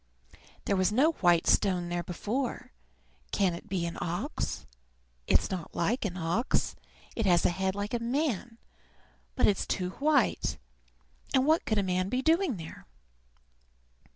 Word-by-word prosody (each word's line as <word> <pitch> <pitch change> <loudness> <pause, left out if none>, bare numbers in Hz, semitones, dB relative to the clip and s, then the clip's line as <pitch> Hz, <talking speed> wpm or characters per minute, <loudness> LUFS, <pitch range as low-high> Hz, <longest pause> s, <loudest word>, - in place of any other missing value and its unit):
"There 200 - +1
was 185 0 +2
no 275 +9 +4
white 175 - +3
stone 180 -3 +2
here 175 0 0
before. 245 +8 -3 0.6
Can 190 -3 +2
it 170 - -9
be 180 -3 -1
an 170 - -5
ox? 175 - -3 0.6
It's - - +3
not 180 -3 -5
like 220 +8 0
an 185 -3 -3
ox. 180 - 0 0.4
It 225 -3 0
has 175 -2 +4
a - - +4
head 190 +1 -1
like 205 +2 -4
a 240 - +1
man, 240 - -1 0.8
but 255 - +3
it's 200 - +1
too 180 -2 -1
white; 290 - +2 0.8
and 260 0 +4
what 315 +2 +3
could 215 - 0
a 200 - +2
man 185 0 0
be 255 +4 -1
doing 325 - +2
there?" 160 -1 -10
200 Hz, 155 wpm, -29 LUFS, 180-250 Hz, 0.8 s, no